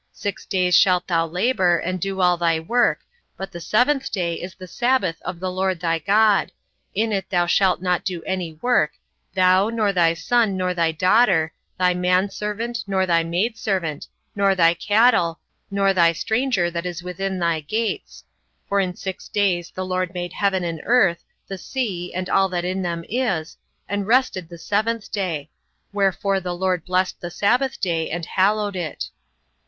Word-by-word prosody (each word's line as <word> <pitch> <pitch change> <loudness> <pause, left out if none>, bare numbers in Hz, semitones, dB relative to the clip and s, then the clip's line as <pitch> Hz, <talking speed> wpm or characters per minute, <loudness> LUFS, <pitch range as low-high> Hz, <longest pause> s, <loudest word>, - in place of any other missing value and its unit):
Six 205 -2 -5
days 180 -2 +2
shalt 180 -1 +4
thou 165 -2 +1
labour, 180 0 +2
and 185 +2 -3
do 195 +1 -2
all 180 -1 +4
thy 165 -2 +1
work; 240 +10 +1 0.4
but 195 - -6
the 175 - -7
seventh 265 - +1
day 175 -4 -1
is 180 +2 -7
the 185 - -10
sabbath 240 -4 0
of 180 0 -6
the 185 0 -3
LORD 185 -1 -1
thy 165 -1 0
God: 205 +4 +3 0.4
in 220 +2 +1
it 195 -1 -2
thou 175 -2 +2
shalt 185 +1 +2
not 180 -1 +1
do 180 -4 -4
any 185 -4 -3
work, 245 -11 +2 0.4
thou, 185 +2 +4
nor 215 -3 0
thy 170 -2 +3
son, 220 +1 +1
nor 180 -1 0
thy 165 -2 +1
daughter, 180 -1 +3 0.2
thy 180 -1 +3
manservant, 205 +6 -1
nor 190 -1 +1
thy 170 -2 +2
maidservant, 185 -3 -2 0.3
nor 200 -1 +3
thy 165 -2 +5
cattle, 205 -2 +3 0.3
nor 195 0 +2
thy 170 -2 +4
stranger 220 -2 0
that 170 +1 -3
is 175 -1 -6
within 190 +2 -3
thy 170 -2 0
gates. 215 +9 -3 0.4
For 200 - +1
in 185 -2 -1
six 190 -1 -6
days 180 -4 0
the 185 - -5
LORD 185 0 -2
made 175 -1 -4
heaven 195 -3 0
and 165 -2 -4
earth, 200 -8 +3 0.2
the 195 -1 -6
sea, 190 -8 -3
and 185 0 -4
all 195 +1 +3
that 175 -1 -2
in 185 +1 -2
them 170 -2 -3
is, 200 -10 -1 0.3
and 205 -1 -2
rested 225 -8 +1
the 170 - -10
seventh 215 +4 -1
day: 165 -7 -3 0.4
wherefore 195 0 +1
the 180 -1 -4
LORD 180 -2 -1
blessed 185 0 0
the 175 - -5
sabbath 250 +9 +1
day, 165 -4 -1
and 170 0 -3
hallowed 205 +2 +1
it. 170 -4 -4
185 Hz, 175 wpm, -22 LUFS, 175-205 Hz, 0.4 s, thy